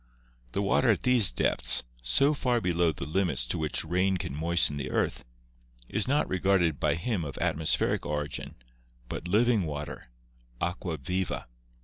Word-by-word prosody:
The 100 Hz, -, 0 dB
water 75 Hz, -7 st, +2 dB
at -, -, +2 dB
these 125 Hz, -, +3 dB
depths, -, -, +2 dB, 0.2 s
so 140 Hz, -, +4 dB
far 125 Hz, -4 st, +1 dB
below 85 Hz, -4 st, +1 dB
the 75 Hz, -, -6 dB
limits 80 Hz, -7 st, 0 dB
to -, -, -2 dB
which 80 Hz, 0 st, -1 dB
rain 90 Hz, +3 st, +1 dB
can 85 Hz, -6 st, -5 dB
moisten 80 Hz, -1 st, +2 dB
the 70 Hz, -, -4 dB
earth, -, -, -1 dB, 0.6 s
is 105 Hz, -, 0 dB
not 145 Hz, +3 st, +2 dB
regarded 90 Hz, -5 st, +1 dB
by -, -, +2 dB
him 95 Hz, +3 st, -2 dB
as 70 Hz, -3 st, -6 dB
of -, -, -10 dB
atmospheric 80 Hz, 0 st, +1 dB
origin, 75 Hz, -1 st, -4 dB, 0.5 s
but 85 Hz, -, -5 dB
living 110 Hz, +3 st, +3 dB
water 75 Hz, -2 st, -5 dB, 0.6 s
(aqua 85 Hz, -2 st, -3 dB
•viva). 90 Hz, +7 st, -3 dB
85 Hz, 155 wpm, -28 LUFS, 75-100 Hz, 0.6 s, so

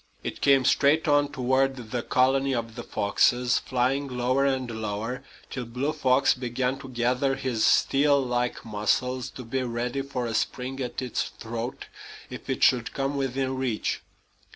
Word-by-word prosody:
It -, -, -5 dB
came 135 Hz, -2 st, +5 dB
straight 150 Hz, +6 st, +3 dB
on 145 Hz, -1 st, +3 dB
toward 130 Hz, +1 st, +1 dB, 0.2 s
the 125 Hz, -, -1 dB
colony 135 Hz, +2 st, +2 dB
of 115 Hz, -1 st, -3 dB
the 120 Hz, -, -6 dB
foxes, 120 Hz, +3 st, +2 dB
flying 130 Hz, +3 st, 0 dB
lower 130 Hz, +2 st, +1 dB
and 125 Hz, -4 st, -2 dB
lower, 110 Hz, +4 st, -3 dB, 0.3 s
till 125 Hz, -2 st, -4 dB
Blue 125 Hz, +6 st, -2 dB
Fox 135 Hz, -2 st, +3 dB
began 125 Hz, +1 st, -2 dB
to 135 Hz, -, -9 dB
gather 125 Hz, +2 st, +1 dB
his 120 Hz, -5 st, -1 dB
steel 140 Hz, +1 st, +4 dB
like 125 Hz, -2 st, -1 dB
muscles 120 Hz, +4 st, 0 dB
to 130 Hz, -, -9 dB
be 130 Hz, +3 st, -2 dB
ready 125 Hz, +2 st, -2 dB
for 135 Hz, -3 st, -4 dB
a 115 Hz, -, -3 dB
spring 130 Hz, +3 st, -2 dB
at 125 Hz, 0 st, -3 dB
its 125 Hz, -, -1 dB
throat 115 Hz, +2 st, -6 dB, 0.5 s
if -, -, -9 dB
it -, -, -1 dB
should 120 Hz, -3 st, +3 dB
come 135 Hz, +1 st, -1 dB
within 135 Hz, -1 st, -1 dB
reach. 125 Hz, -5 st, -1 dB
130 Hz, 160 wpm, -26 LUFS, 120-135 Hz, 0.5 s, came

